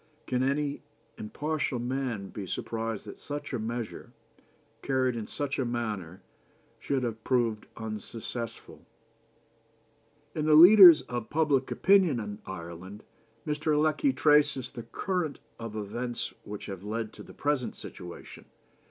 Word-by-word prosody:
Can 125 -1 0
any 140 +2 0 0.4
impartial 150 +4 -2
man 120 -5 -3
be 100 -3 -7
surprised 115 +2 -3
that - - -10
such 145 0 -6
a 125 - -1
measure, 115 +1 -5 0.7
carried 130 -2 +1
in 110 -2 -4
such 145 -1 -2
a - - +2
manner, 105 -8 -4 0.6
should 135 -2 -1
have 115 -2 -3
proved 115 -4 0
unsuccessful?" 115 +1 -6 1.5
In 155 - -2
the 155 - +6
Leaders 175 0 +10
of 120 -3 -5
Public 145 -4 +2
Opinion 185 -9 +4
in 105 -1 -6
Ireland 90 +3 -8 0.4
Mr. 150 0 +1
Lecky 155 - +2
traces 145 - +3
the 120 - -7
current 180 -6 -2 0.2
of 115 -2 -6
events 120 +4 -4
which 105 0 -7
have 95 -2 -7
led 110 +1 -3
to - - -11
the - - -13
present 145 -4 -1
situation. 90 -1 -10
120 Hz, 130 wpm, -29 LUFS, 110-145 Hz, 1.5 s, Leaders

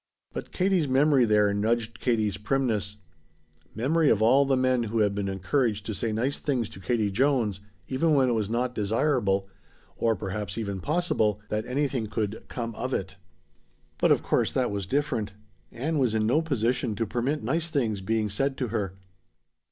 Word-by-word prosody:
But - - -6
Katie's 185 -4 +1
memory 135 0 +4
there 105 -2 +3
nudged 110 +2 -1
Katie's 110 -5 +1
primness; 105 -3 -1 0.8
memory 150 +6 +2
of 105 - +3
all 130 +6 +5
the 135 -1 +3
men 130 -1 +2
who 115 0 0
had 105 -1 +2
been 100 -1 -2
encouraged 105 +2 0
to 110 - -3
say 110 +3 -1
nice 125 +6 -1
things 125 -7 -1
to - - -12
Katie 105 +1 0
Jones, 120 -4 +1 0.3
even 150 +4 +2
when 135 -2 +4
it - - +2
was 110 -3 0
not 120 +2 -1
desirable 105 -3 +1 0.5
or 115 -1 +1
perhaps 100 0 -4
even 100 -4 -3
possible 145 - +1
that 110 +2 -2
anything 130 -3 -1
could 110 0 -3
"come 115 -2 -4
of 130 +4 -2
it." 95 0 -4 0.8
But - - +4
of - - +3
course - - +1
that 125 -4 +1
was 100 -2 -3
different. 125 -6 -1 0.4
Ann 150 +6 -2
was 120 -5 +2
in 110 -1 +1
no 130 +8 +3
position 125 -6 0
to 115 - -1
permit 125 +7 -1
nice 165 +1 -1
things 115 -10 -1
being 110 +2 0
said 135 +7 -1
to 125 - -2
her. 100 -4 -2
115 Hz, 175 wpm, -27 LUFS, 105-135 Hz, 0.8 s, all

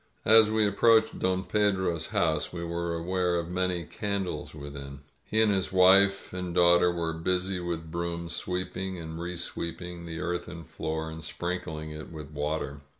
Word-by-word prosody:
As 110 0 +7
we 110 0 +3
approached 110 +2 +4
Don 95 0 +1
Pedro's 95 -4 +1
house 80 -2 +1
we 85 -1 -5
were 85 0 -2
aware 90 +1 0
of 85 0 -2
many 90 -1 0
candles 100 -6 -4
within. 70 -1 -8 0.2
He 110 - 0
and 110 - +3
his 95 -2 +1
wife 95 +1 +5
and 90 -1 -4
daugh 85 -1 +6
ter 90 - +3
were 85 -1 -2
busy 90 +3 -1
with 85 -2 -4
brooms, 85 0 -3
sweeping 90 +1 -3
and 80 -1 -7
resweeping 85 0 -4
the 80 0 -5
earthen 85 0 -4
floor, 80 0 -4
and 80 0 -8
sprinkling 80 -2 -4
it 75 +1 -8
with 75 -2 -8
water. 75 -1 -3
85 Hz, 160 wpm, -28 LUFS, 80-95 Hz, 0.2 s, As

